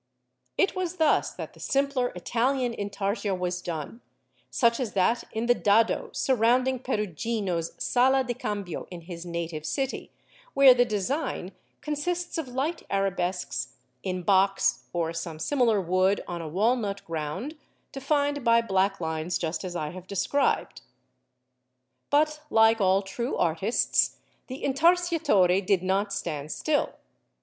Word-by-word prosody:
It 395 - +2
was 365 -1 -2
thus 315 -4 +2
that - - -7
the - - -18
simpler 275 -2 +1
Italian 245 +6 0
Intarsia 200 -1 -2
was 180 0 -3
done, 170 - -6 0.5
such 235 -1 +2
as 245 -5 -3
that 215 +5 +1
in 225 +1 -2
the 245 - +5
dado 220 0 +2
surrounding 255 +1 +2
Perugino's 205 - -2
Sala 265 +2 +3
del 245 -1 -2
Cambio 205 -6 -4
in 175 -2 -8
his 170 0 -8
native 170 -2 -4
city, 270 - -3 0.5
where 275 -2 +9
the 245 0 +3
design 215 - -2 0.3
consists 340 +4 -2
of 310 - -4
light 270 +7 -2
arabesques 190 -2 -2 0.3
in 185 -2 -3
box 195 +1 +2
or 165 -1 -1
some 165 -1 -5
similar 235 - +2
wood 185 +2 +1
on 175 -1 -4
a 165 - -6
walnut 205 +2 0
ground, 165 - -4 0.4
defined 285 0 0
by 230 -1 +5
black 195 -3 +1
lines 160 +1 -2
just 165 +3 -3
as 180 -1 -5
I 155 -3 -3
have 185 +1 -10
described. 200 +9 0 1.3
But 300 +1 +2
like 225 0 +4
all 190 +1 +3
true 235 +6 -3
artists 170 +7 +1 0.3
the 260 +1 -7
Intarsiatore 290 - +3
did 185 -1 +1
not 195 +2 0
stand 155 -6 -4
still. 305 -2 0
205 Hz, 135 wpm, -27 LUFS, 180-260 Hz, 1.3 s, where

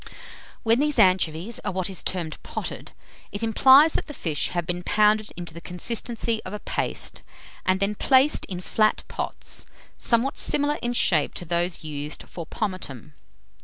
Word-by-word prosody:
When 230 +2 +3
these 300 0 +2
anchovies 185 +4 +2
are - - -3
what 185 -1 -2
is 190 -2 -2
termed 170 -4 -4
potted, - - -6 0.4
it 205 +3 -4
implies 265 +7 +6
that - - -2
the 295 - -8
fish 155 -4 -1
have 175 -1 -2
been 175 0 -3
pounded 210 +2 +2
into 175 -2 -6
the 170 - -9
consistency 225 +5 -1
of 185 - -7
a 210 - -4
paste, - - -4 0.5
and 185 0 +3
then 200 +1 +1
placed 265 +6 +4
in 180 -2 -6
flat 215 +3 +1
pots, - - -5 0.3
somewhat 240 +3 +1
similar 290 0 +1
in 240 0 -1
shape - - +2
to 175 - -5
those 170 +1 -1
used 150 -1 -6
for 170 -3 -8
pomatum. 180 - -5
195 Hz, 165 wpm, -25 LUFS, 175-235 Hz, 0.5 s, implies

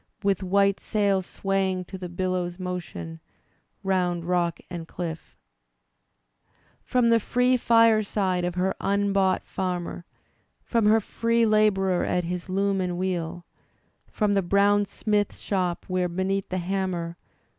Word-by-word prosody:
With 195 -1 +1
white 200 +1 +2
sail 200 -3 +1
swaying 190 0 -1
to 190 - -9
the 180 -1 -6
billow's 180 0 -2
motion 175 - -6 0.6
Round 180 -3 0
rock 175 -1 0
and 170 -2 -7
cliff 165 -2 -6 0.7
— - - -50 0.7
From 245 -2 +2
the 230 0 +5
free 250 +3 +2
fireside 215 -6 +3
of 175 0 -2
her 185 +1 +1
unbou^t 200 -1 +1
farmer 180 -2 -4 0.3
— - - -44
From 230 -3 +3
her 220 +1 +5
free 230 +2 +1
labourer 200 -4 +3
at 180 0 0
his' 180 +2 -4
loom 195 +1 +1
and 180 -1 -2
wheel 175 -2 -3 0.3
— - - -43
From 210 -2 +1
the 200 - +3
brown 200 +2 +3
smith 205 +1 -1
shop, 180 -3 -2
where, 185 -1 0
beneath 190 +2 -1
the 185 - -2
hammer. 180 -2 -2
190 Hz, 140 wpm, -26 LUFS, 180-200 Hz, 0.7 s, the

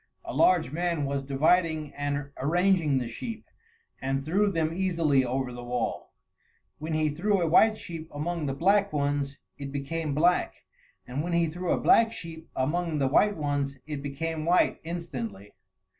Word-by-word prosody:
A - - -5
large 170 -8 +3
man 170 -2 -1
was 140 0 -1
dividing 155 +3 +1
and 145 0 -3
arranging 170 0 +2
the 125 -2 -1
sheep, 225 - -6 0.6
and 135 +1 -1
threw 200 +6 +2
them 165 -2 0
easily 165 -7 +2
over 130 0 -2
the 120 0 -8
wall. 120 -1 -3 0.7
When 155 +2 -4
he 155 0 +2
threw 195 +7 +1
a 170 - +1
white 215 +7 +5
sheep 165 -4 -8
among 160 +1 -3
the 135 - -2
black 200 +6 +3
ones 140 -1 -1 0.2
it 140 -1 -5
became 145 +2 -3
black, 175 +4 +2 0.4
and 130 +4 -3
when 175 +1 -2
he 170 0 +3
threw 175 +2 -3
a - - +2
black 225 -1 +5
sheep 165 -4 -9
among 160 +4 0
the 135 -2 +2
white 205 +8 +3
ones, 145 -2 -1
it 150 -2 -5
became 155 +3 -3
white 175 +3 +3
instantly. 130 - -6
155 Hz, 165 wpm, -28 LUFS, 140-175 Hz, 0.7 s, white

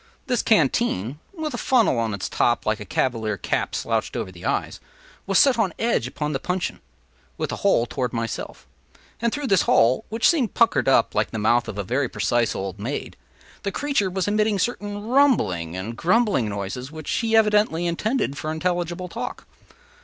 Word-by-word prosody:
This 250 -3 +1
canteen 150 - +1
(with 315 -5 -4
a - - -3
funnel 235 - +3
on 115 -1 0
its 100 - -4
top, 120 - +1
like 110 0 0
a 105 - -7
cavalier 110 -1 -1
cap - - -2
slouched - - -1
over 95 - -4
the 85 -1 -11
eyes) - - -2 0.5
was 195 -1 +2
set 265 -4 +5
on 195 -6 +1
edge 230 - +1
upon 150 +3 -3
the 135 - -1
puncheon, 180 +4 -2 0.6
with - - -2
the - - -3
hole 115 - +3
toward 125 -1 -3
myself; 115 -2 -5 0.6
and 235 -1 +1
through 290 +3 -3
this 195 - +4
hole, 120 +3 +4
which 225 +1 +2
seemed 275 -10 +1
puckered 230 - +3
up 130 -3 +4
like 105 0 +1
the - - -5
mouth 115 +3 +2
of 105 - -6
a 100 - -2
very 125 +6 -1
precise 120 -2 0
old 95 0 -5
maid, 125 +8 -4 0.5
the 200 - -2
creature 275 -4 0
was 190 +1 -2
emitting 210 0 +2
certain 205 -1 -2
rumbling 110 - +2
and 110 +5 -5
grumbling 185 - +2
noises 100 +7 -5
which 155 -2 -6
he 225 -1 +1
evidently 210 -6 +3
intended 210 - -1
for 155 - -4
intelligible 175 +2 -2
talk. - - -6
160 Hz, 185 wpm, -23 LUFS, -, 0.6 s, set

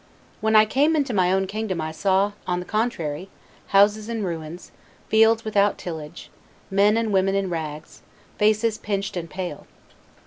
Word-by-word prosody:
When 220 0 +1
I 215 0 +8
came 290 +8 +2
into 280 -5 0
my 185 -3 +2
own 190 0 +2
kingdom 200 -2 -3
I 155 0 -3
saw, 195 +4 +1 0.2
on 180 -1 0
the 180 - -6
contrary, 185 -6 -2 0.4
houses 210 +2 +3
in 225 -2 -3
ruins, 165 -1 -6 0.4
fields 225 +1 +4
without 205 -1 +2
tillage, 160 -4 -8 0.4
men 205 +3 +4
and 225 -2 -1
women 195 0 +2
in 195 -2 -1
rags, 155 -2 -6 0.4
faces 215 +1 +2
pinched 200 -2 -3
and 170 -2 -5
pale. 180 -3 -6
195 Hz, 160 wpm, -23 LUFS, 180-215 Hz, 0.4 s, I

